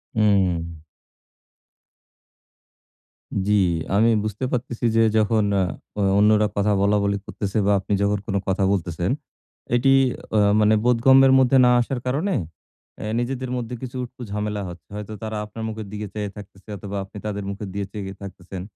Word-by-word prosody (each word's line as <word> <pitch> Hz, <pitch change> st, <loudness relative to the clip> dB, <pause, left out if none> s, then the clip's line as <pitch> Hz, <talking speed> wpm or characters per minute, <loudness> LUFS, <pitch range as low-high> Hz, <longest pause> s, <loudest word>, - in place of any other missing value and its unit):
উম। 90 Hz, -6 st, +1 dB, 2.7 s
জি, 105 Hz, -, +3 dB, 0.4 s
আমি 110 Hz, +3 st, +4 dB
বুঝতে 110 Hz, +4 st, -3 dB
পারতেছি 120 Hz, -1 st, -3 dB
যে 115 Hz, -, +5 dB, 0.2 s
যখন 110 Hz, 0 st, +3 dB, 0.5 s
অ্যা 105 Hz, -, 0 dB, 0.2 s
অন্যরা 105 Hz, 0 st, +4 dB
কথা 100 Hz, +1 st, +2 dB
বলা-বলি 100 Hz, 0 st, +2 dB
করতেছে 100 Hz, 0 st, -4 dB
বা 105 Hz, -, +4 dB
আপনি 100 Hz, +2 st, -3 dB
যখন 100 Hz, +1 st, +2 dB
কোন 100 Hz, -, -2 dB
কথা 95 Hz, +1 st, +1 dB
বলতেছেন। 85 Hz, 0 st, -1 dB, 0.6 s
এটি 135 Hz, +3 st, +4 dB, 0.4 s
অ্যা 105 Hz, -2 st, +4 dB
মানে 105 Hz, 0 st, +4 dB
বোধগম্যের 130 Hz, +2 st, +6 dB
মধ্যে 130 Hz, +1 st, +4 dB
না -, -, +5 dB
আসার 125 Hz, +1 st, -3 dB
কারনে 155 Hz, +9 st, 0 dB, 0.6 s
অ্যা 105 Hz, -, -4 dB
নিজেদের 130 Hz, +1 st, -3 dB
মধ্যে 125 Hz, 0 st, -4 dB
কিছু 130 Hz, 0 st, -7 dB
উটকো 125 Hz, +1 st, -10 dB
ঝামেলা 105 Hz, 0 st, -2 dB
হচ্ছে। 85 Hz, -2 st, -12 dB
হয়তো 105 Hz, +1 st, -6 dB
তারা 110 Hz, -1 st, -3 dB
আপনার 110 Hz, +2 st, -8 dB
মুখের 110 Hz, -2 st, -6 dB
দিকে 105 Hz, 0 st, -5 dB
চেয়ে 105 Hz, -1 st, -3 dB
থাকতেছে 100 Hz, -1 st, -13 dB
অথবা 100 Hz, 0 st, -6 dB
আপনি 95 Hz, -, -12 dB
তাদের 100 Hz, -1 st, -3 dB
মুখের 100 Hz, 0 st, -6 dB
দিকে 100 Hz, 0 st, -2 dB
চেয়ে 100 Hz, -2 st, -6 dB
থাকতেছেন। 95 Hz, -1 st, -8 dB
105 Hz, 150 wpm, -23 LUFS, 100-115 Hz, 2.7 s, বোধগম্যের